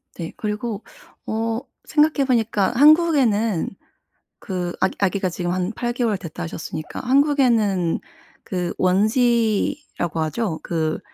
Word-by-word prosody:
네. 165 -2 -6
그리고 210 0 -3 0.4
어 225 +1 -1 0.3
생각해 300 -2 +3
보니까 225 -6 +1
한국에는 265 - +4 0.7
그 180 -4 -3
아기 190 - +1
아기가 195 -1 +1
지금 175 0 -3
한 185 +2 -1
8 240 +1 -2
개월 230 -5 0
됐다 175 -1 -7
하셨으니까 160 -1 -6
한국에는 245 - +2 0.4
그 180 -2 -3
원지라고 215 - +1
하죠. 165 +1 -2
그 160 -2 -1
210 Hz, 245 characters per minute, -22 LUFS, 180-240 Hz, 0.7 s, 한국에는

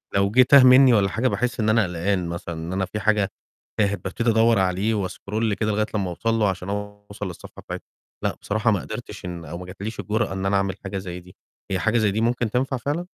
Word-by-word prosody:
لو 100 0 +2
جِه 125 - +6
تاه 135 +1 +7
منّي 130 0 +7
والَّا 100 -3 +3
حاجة 115 +5 0
باحس 125 -1 -1
إن 110 - +2
أنا 110 0 +4
قلقان 90 0 -1
مثلًا، 85 0 -5
إن 80 +3 -5
أنا 95 0 0
في 105 - -5
حاجة 105 -1 +2 0.5
تاهت 100 -3 +1
بابتدي 115 +5 -1
أدوّر 115 -1 +4
عليه 95 +4 +1
وأسكرول 105 +2 -2
كده 105 +1 -1
لغاية 105 +1 +1
لمّا 95 -3 0
أوصل 115 +6 -1
له 110 -3 +2
عشان 95 0 -4
أوصل 105 0 -6
للصفحة 90 - -10
بتاعت - - -7 0.4
لأ، - - 0
بصراحة 110 +2 +1
ما 100 - +1
قدرتش - - -8
إن 85 -2 -6
أو 80 +3 -6
ما 90 - -8
جاتش 100 +4 -7
لي - - -3
الجُرأة 110 -1 -1
إن 95 0 -3
أنا 100 +1 +2
أعمل 95 -1 -1
حاجة 95 0 -4
زي 90 -2 -6
دي، 90 +1 -16 0.4
هي 95 - 0
حاجة 110 +5 +1
زي 110 -3 +2
دي 110 +3 -1
ممكن 120 -1 +1
تنفع 130 +2 0
فعلًا؟ 145 +8 -2
105 Hz, 235 wpm, -23 LUFS, 95-115 Hz, 0.5 s, تاه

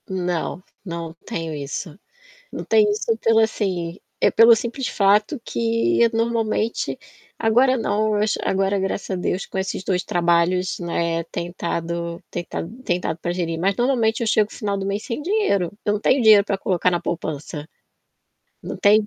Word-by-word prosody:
Não, 180 -1 -2 0.2
não 170 -2 -5
tenho 165 -1 -4
isso. 145 +3 -5 0.6
Não - - -5
tenho 215 -2 +4
isso 220 +2 0
pelo 225 0 +3
assim, 185 -5 -1 0.2
é - - +4
pelo 230 0 +7
simples 240 +4 -3
fato 210 +7 +2
que 115 - +2
normalmente 225 -1 -1 0.4
agora 250 +4 +3
não, 215 -2 0
mas, 210 0 +1
agora, 195 +1 +1
graças 195 +1 -3
a - - 0
Deus, 180 +1 -2
com - - -5
esses 190 0 -3
2 180 -2 0
trabalhos, 175 +1 +1
né, 170 -1 -1
tem 170 +1 -5
tado 170 -1 -3
tem 175 - -4
tado 225 +9 -7
tem 175 -8 0
dado 170 -2 -3
para 175 +2 -2
gerir, 170 -2 -2
mas, 195 +2 +1
normalmente, 240 -3 +1
eu - - 0
chego 215 -1 +2
o - - -11
final 200 -2 -2
do 195 - -3
mês 200 +2 -2
sem 245 +1 -4
dinheiro. 310 - +1
Eu 205 - +2
não 210 - -2
tenho 260 +4 +3
dinheiro 215 -2 +7
para 200 - -1
colocar 180 -1 +1
na 175 -1 0
poupança. 155 -2 -5 0.9
Não - - -5
tem 210 +1 +4
195 Hz, 175 wpm, -22 LUFS, 170-220 Hz, 0.9 s, pelo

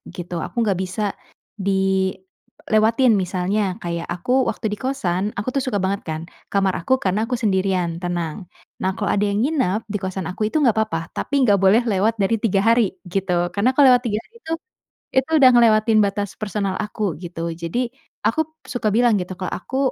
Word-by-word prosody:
gitu, 175 0 -7
aku - - -11
nggak 205 -5 +1
bisa 185 +3 -4 0.6
dilewatin 195 +5 +1
misalnya 185 +3 -1 0.2
kayak 170 -1 -3
aku 180 +7 -4 0.2
waktu - - -5
di 210 - -5
kosan 190 -9 -1
aku 205 - -4
tuh 275 - +1
suka 210 -6 -1
banget 195 +1 0
kan 155 0 -3 0.3
kamar 195 -1 +2
aku, 175 - +1
karena 190 +2 +1
aku 250 +2 -1
sendirian 190 -5 0
tenang. 175 -3 -2 0.4
Nah 190 - +1
kalau 205 - -2
ada 205 - +1
yang 200 +1 0
nginep 260 - +1
di 205 - 0
kosan 190 -1 -3
aku 185 - -8
itu 220 - -8
nggak 245 -6 +4
apa-apa, 215 -7 0 0.2
tapi - - -4
nggak 205 -5 +4
boleh 205 +5 +6
lewat 210 +3 +2
dari 195 +4 +2
3 195 -3 +2
hari 230 +1 +5 0.3
gitu, 195 -2 -1 0.2
karena 205 +5 +2
kalau 285 -1 +7
lewat 250 0 +4
3 210 -2 0
hari - - -28
itu, 320 - -8 0.7
itu 265 +3 +2
udah 260 -2 +8
ngelewatin 220 -2 +5
batas 200 0 -2
personal 200 -2 -2
aku 210 +1 -5 0.2
gitu. 170 -1 -6 0.2
Jadi 235 +9 -1 0.4
aku 315 +6 +1 0.2
suka 220 -4 -1
bilang 235 0 +4
gitu 180 0 -4
kalau 185 - -3
aku 260 +8 -5
200 Hz, 185 wpm, -21 LUFS, 185-230 Hz, 0.7 s, udah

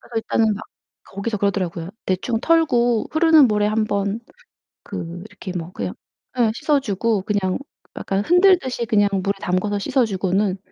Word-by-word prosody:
그래서 240 - -20
일단은 220 -1 +1
막 215 +2 -8 0.4
거기서 205 +3 -4
그러더라고요. 185 -4 -2 0.2
대충 205 +5 -1
털고 245 -9 +2
흐르는 315 -4 +6
물에 210 -1 +1
1 215 +1 +1
번 200 +1 -1 0.6
그 170 +1 -6
이렇게 185 - -8
뭐 170 0 -5
그냥 95 - -4 0.4
예, 235 -3 +3
씻어주고 230 -7 0
그냥 190 -2 -1 0.4
약간 195 +1 -2
흔들듯이 355 - +3
그냥 205 -2 +3
물에 200 +1 +1
담가서 200 +3 -1
씻어주고는 195 -4 0
210 Hz, 325 characters per minute, -21 LUFS, 195-240 Hz, 0.6 s, 흐르는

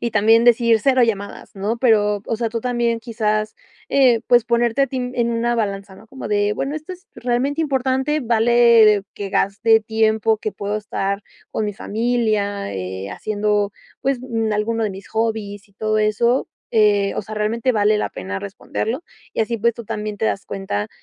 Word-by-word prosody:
y 235 - -1
también 225 +3 +4
decir: 235 -2 +4
"Cero 260 -2 +4
llamadas", 205 -3 -4
¿no?, 205 +4 -2
pero, 210 -4 +3
o 225 - -1
sea, 230 -1 -2
tú 230 0 -3
también, 240 -1 0
quizás, 215 -2 -1 0.3
eh, 250 -5 +4
pues, 240 -2 +5
ponerte 235 +2 +2
a - - +3
ti 260 - -5 0.2
en 235 -1 +1
una 235 +1 0
balanza, 200 -3 -3
¿no?, 220 - -16
como 265 -5 -7
de 205 0 +1
bueno: 275 +7 -3
"¿Esto 310 +4 -7
es 365 +2 -13
realmente 255 +5 -1
importante? 265 +1 0
¿Vale 230 -3 +5
que 200 -1 -5
gaste 220 +4 +3
tiempo 220 0 +1
que 215 - -4
puedo 205 +1 -3
estar 200 -1 -3 0.3
con 220 - -2
mi 205 - -3
familia, 215 - -1
eh, 95 +1 -5
haciendo, 210 - -1 0.3
pues, 265 -1 0
mm, 225 -4 -2
alguno 225 +2 0
de 210 - -1
mis 195 0 -10
hobbies 215 -2 -3
y 200 - -28
todo 215 +1 0
eso?", 235 +4 +1 0.2
eh, 205 -2 +3
o - - -1
sea, 215 +2 -8
"¿Realmente 225 +4 0
vale 210 0 +3
la - - -1
pena 95 +1 -5
responderlo?", 220 - -4 0.3
y - - -1
así 230 +1 -1
pues, 235 +1 +2
tú 235 - -9
también 210 0 -4
te 220 - -1
das 195 - -1
cuenta, 110 - -3
220 Hz, 185 wpm, -20 LUFS, 205-235 Hz, 0.3 s, pues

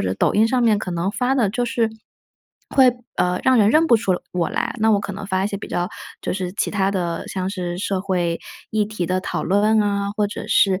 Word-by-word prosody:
者 95 0 -1
抖 - - +1
音 220 +2 +4
上 250 +1 +1
面， 220 -3 +4
可 190 - -5
能 175 +3 -1
发 250 +4 0
的 235 -7 +2
就 245 +3 -1
是， 230 -1 0 0.8
会， 265 -2 +5 0.3
呃， 180 0 +1
让 260 -1 +5
人 205 -2 +5
认 310 +7 +4
不 245 - +5
出 205 -4 +2 0.2
我 175 -2 0
来， - - -2
那 220 +1 +3
我 205 -2 +3
可 200 - -5
能 200 +1 -7
发 190 -1 0
一 - - 0
些 200 - -4
比 - - -8
较 175 - -1 0.4
就 - - -2
是 185 -1 -3
其 - - -1
它 195 -1 +1
的， 175 -4 -2
像 185 0 -3
是 180 -3 -4
社 195 0 -1
会 175 -3 -1 0.3
议 215 -1 +1
题 215 -4 -3
的 185 0 0
讨 - - -3
论 210 +3 +3
啊， 200 -1 0
或 210 - +2
者 205 - -7
是， 190 -2 +3
200 Hz, 260 characters per minute, -21 LUFS, 185-220 Hz, 0.8 s, 会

